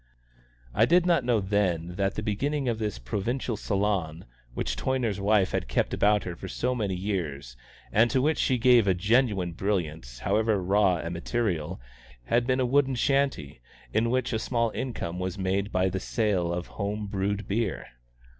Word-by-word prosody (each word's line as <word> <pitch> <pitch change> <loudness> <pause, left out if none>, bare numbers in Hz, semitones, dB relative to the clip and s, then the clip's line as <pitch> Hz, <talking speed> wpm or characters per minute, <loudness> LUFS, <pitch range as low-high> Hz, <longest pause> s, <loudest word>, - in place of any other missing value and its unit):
I - - +4
did 175 +1 +4
not 170 -6 +3
know 120 -2 +2
then 95 -4 0
that 95 +2 -1
the 105 - -3
beginning 135 +7 -1
of 115 -2 -1
this 105 -2 -2
provincial 105 - -2
salon, 95 -6 -1 0.3
which - - -2
Toyner's 115 - -1
wife 100 -1 +3
had - - -2
kept - - 0
about 105 -1 +3
her 90 - -5
for 95 - -8
so 125 +6 -1
many 105 -6 -1
years, 80 -10 -3 0.4
and 115 +3 +4
to 130 - +2
which 155 +4 +1
she 130 - +2
gave 120 -3 +5
a 95 - +3
genuine 100 -2 +2
brilliance, 80 -10 -3
however 105 - +1
raw 95 -1 +2
the 85 - -4
material, 90 -2 -2 0.5
had 120 - +1
been 130 0 +2
a 130 - +2
wooden 135 +1 +2
shanty, 135 - 0 0.3
in 115 +1 +2
which 125 0 0
a 110 - 0
small 115 -1 0
income 90 -10 -4
was 95 +2 -3
made 95 +1 -1
by 95 +1 +2
the 95 0 -2
sale 95 -5 0
of 85 0 -3
home 105 +1 -4
brewed 100 +1 -2
beer. 105 0 -1
100 Hz, 175 wpm, -27 LUFS, 90-120 Hz, 0.5 s, gave